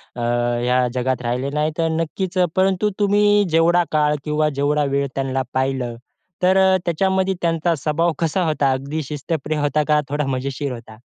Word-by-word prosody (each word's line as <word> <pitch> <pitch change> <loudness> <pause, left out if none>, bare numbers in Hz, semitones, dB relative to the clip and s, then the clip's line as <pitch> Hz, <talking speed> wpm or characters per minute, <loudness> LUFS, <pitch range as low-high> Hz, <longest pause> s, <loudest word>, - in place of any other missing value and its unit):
अ, 120 - -5
ह्या 120 +1 +1
जगात 130 0 -1
राहिले 125 +3 -2
नाहीत 150 +2 -1
अन् 160 -1 0
नक्कीच, 185 +3 -4 0.2
परंतु 190 +2 +2
तुम्ही 205 0 +4
जेवढा 165 +2 +3
काळ 150 -1 +2
किंवा 150 0 +1
जेवढा 145 +1 +2
वेळ 140 0 +1
त्यांना 135 -1 -1
पाहिलं, 130 -2 -1 0.5
तर 185 +1 +4
अ, 190 0 +5
त्याच्यामध्ये 190 +3 +1
त्यांचा 165 0 +1
स्वभाव 155 +4 0
कसा 170 +3 0
होता? 145 -3 +1
अगदी 140 +4 -3
शिस्तप्रिय 150 +1 -3
होता 145 +1 +1
का, 150 -1 +3
थोडा 145 +1 -1
मजेशीर 135 +1 -3
होता? 115 -2 -11
150 Hz, 160 wpm, -20 LUFS, 135-170 Hz, 0.5 s, अ